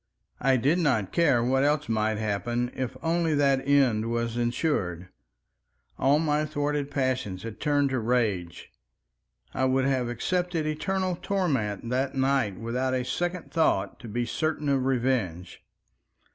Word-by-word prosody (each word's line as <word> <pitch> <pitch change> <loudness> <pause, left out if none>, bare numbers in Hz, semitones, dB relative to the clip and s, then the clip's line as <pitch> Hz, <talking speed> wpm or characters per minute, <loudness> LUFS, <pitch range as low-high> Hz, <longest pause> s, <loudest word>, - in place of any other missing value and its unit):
I 130 0 +3
did 145 +9 +2
not 125 - +1
care 140 -9 +3
what 135 +2 +2
else 150 +1 +1
might 110 -1 0
happen, 120 +3 -1
if 130 -3 -4
only 165 -1 +1
that 140 -2 +3
end 125 -6 +3
was 115 0 -1
ensured. 120 - -1 0.9
All 135 +3 +4
my 150 -1 +1
thwarted 145 -1 -2
passions 130 -9 -2
had 115 -2 -7
turned 145 -2 +1
to 130 - 0
rage. 110 -8 -1 0.8
I 130 - +1
would 130 0 +2
have 130 -3 0
accepted 175 +6 -1
eternal 185 +4 -1
torment 135 - -1
that 130 +2 0
night 135 -7 +1
without 125 +3 -1
a 125 -1 -1
second 175 +7 -3
thought, 100 -12 +1
to 120 - -9
be 120 +3 -2
certain 155 +1 -1
of 135 -2 +1
revenge. 120 -9 -1
130 Hz, 145 wpm, -27 LUFS, 115-150 Hz, 0.9 s, All